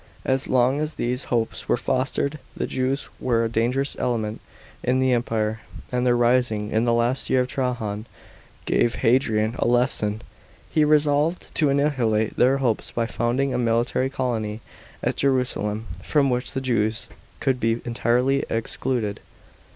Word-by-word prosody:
As 130 0 +1
long 130 +3 +2
as 155 0 -3
these 125 +2 -1
hopes 115 -2 -2
were - - +3
fostered 135 +4 -1 0.2
the - - -1
Jews 130 +2 -1
were 115 -2 +1
a - - +1
dangerous 125 +5 0
element 110 -3 -1 0.4
in 125 +1 +2
the 130 -1 +3
Empire, 110 -2 0 0.3
and 125 0 +1
their 120 0 +4
rising 120 -3 +2
in 110 +2 +2
the 120 - +2
last 120 +3 +1
year 130 - +4
of 125 - -1
Trajan 115 -5 -2 0.6
gave 120 - +2
Hadrian 115 -3 +2
a - - +1
lesson. 120 -3 +1 0.5
He 155 - +3
resolved 150 +2 +2
to 150 -3 +2
annihilate 125 -7 +1
their 130 +3 +4
hopes 120 -5 0
by 115 - -1
founding 120 +4 0
a - - 0
military 120 +2 +1
colony 115 -5 -2 0.4
at - - 0
Jerusalem, 125 -5 0 0.2
from 140 -3 +2
which 125 +1 -2
the 135 - -2
Jews 115 -3 0 0.3
should 130 -3 0
be 115 0 +1
entirely 125 +3 +1
ex 115 0 -3
eluded. 115 -6 0
125 Hz, 155 wpm, -24 LUFS, 115-130 Hz, 0.6 s, their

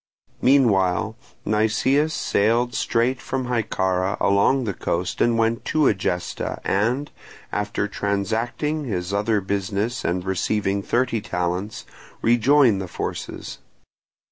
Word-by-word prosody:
Meanwhile 110 -5 +3 0.3
Nicias 110 +8 +2
sailed 120 -4 +1
straight 120 +3 0
from 130 -1 -3
Hyccara 95 -6 0
along 100 +7 +3
the 105 -4 -2
coast 90 0 -2
and 120 -1 +3
went 115 +1 +1
to 155 -1 +2
Egesta 90 -3 -2
and, 120 +9 0 0.4
after 105 0 -1
transacting 115 +10 -2
his 95 -5 -3
other 105 +1 +1
business 100 +4 -2
and 90 +1 -1
receiving 100 +1 0
thirty 120 +1 0
talents, 90 +3 -3 0.4
rejoined 120 -2 +4
the 95 - -5
forces. 85 - -6
110 Hz, 110 wpm, -23 LUFS, 95-120 Hz, 0.4 s, rejoined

